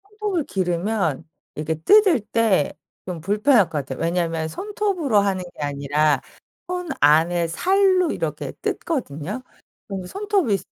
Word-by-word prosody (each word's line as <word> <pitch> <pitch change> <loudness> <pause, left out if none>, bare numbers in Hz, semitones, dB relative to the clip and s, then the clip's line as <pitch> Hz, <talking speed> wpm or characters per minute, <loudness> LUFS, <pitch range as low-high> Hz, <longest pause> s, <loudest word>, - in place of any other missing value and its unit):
손톱을 410 -4 -3
기르면 180 -3 -1 0.3
이게 155 +1 -2
뜯을 375 - +5
때 210 -6 +1 0.3
좀 180 -3 -4
불편할 210 - +4
것 170 - -11
같아요. 135 -1 -6
왜냐면 165 -1 -1
손톱으로 375 - -1
하는 195 -2 0
게 - - -9
아니라 145 +1 +1 0.5
손 360 0 -3
안에 165 +4 +4
살로 370 - +2
이렇게 - - -3
뜯거든요 210 - -3 0.5
그럼 195 -2 -5
손톱이 390 - 0
195 Hz, 275 characters per minute, -22 LUFS, -, 0.5 s, 뜯을